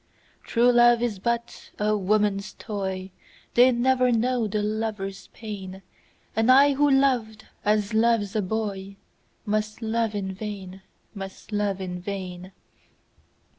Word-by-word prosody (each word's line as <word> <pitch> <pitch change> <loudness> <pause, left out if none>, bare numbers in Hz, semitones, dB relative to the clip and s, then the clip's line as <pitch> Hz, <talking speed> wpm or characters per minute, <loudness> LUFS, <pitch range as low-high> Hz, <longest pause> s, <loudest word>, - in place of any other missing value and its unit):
True 240 +1 +3
love 240 0 +5
is 220 -5 -2
but 235 +2 -3
a 210 0 +1
woman's 200 0 0
toy, 190 -2 -5 0.4
They 250 +2 +6
never 255 +1 +2
know 240 0 +1
the 210 0 -1
lover's 210 -2 -3
pain, 195 -3 -8 0.5
And 225 +3 +4
I 280 +2 +6
who 290 +1 +3
loved 250 -6 +1 0.2
as 210 0 +1
loves 220 -2 +2
a 215 - +2
boyMust 210 +1 -4
love 225 -1 0
in 190 -2 -3
vain, 195 -2 -7 0.3
must 195 +1 -9
love 205 -2 -1
in 180 -1 -5
vain. 185 -1 -6
215 Hz, 125 wpm, -25 LUFS, 195-235 Hz, 0.5 s, They